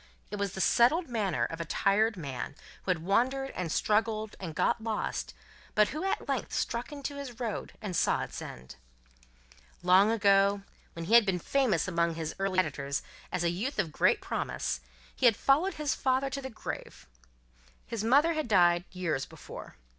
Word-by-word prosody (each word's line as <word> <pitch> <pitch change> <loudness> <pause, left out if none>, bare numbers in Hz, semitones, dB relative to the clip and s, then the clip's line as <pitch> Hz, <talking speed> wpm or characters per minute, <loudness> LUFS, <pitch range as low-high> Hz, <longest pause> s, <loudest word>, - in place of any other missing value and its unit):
It 205 - -3
was 200 -2 -2
the 190 - -3
settled 285 - +4
manner 210 -8 0
of 165 0 -5
a - - -1
tired 205 +5 +2
man, 140 -4 -5 0.3
who - - -8
had 170 -3 +1
wandered 260 +8 +1
and 175 -3 -4
struggled 215 +2 +1
and 165 -5 -6
got 235 +7 +1
lost, 220 -1 -3 0.4
but 210 0 +5
who 305 +4 -4
at 390 - -1
length - - -2
struck 235 +5 -2
into 285 0 -5
his 255 -4 -7
road 230 -4 -4
and 190 -4 -3
saw - - +2
its - - -7
end. 65 +1 -9 1.1
Long 185 +3 +6
ago, 200 -2 +3 0.3
when 165 0 -6
he 215 - -1
had 235 -1 +9
been 195 -3 0
famous 215 - +1
among 170 -2 +1
his 160 -1 -4
earliest 195 -1 -1
competitors 140 -4 -3 0.3
as 180 - -1
a 170 - +2
youth 225 +11 -3
of 180 -7 0
great - - +3
promise, - - -2 0.3
he 250 - +4
had 225 - +4
followed 325 +7 +3
his 300 -2 0
father 265 0 0
to 275 +1 -3
the 265 - -5
grave. 225 - -7 0.8
His 225 -2 -4
mother 285 +8 +4
had 310 -4 -2
died, 175 -4 +4
years 165 -7 -2
before. - - -10
210 Hz, 180 wpm, -30 LUFS, 175-250 Hz, 1.1 s, had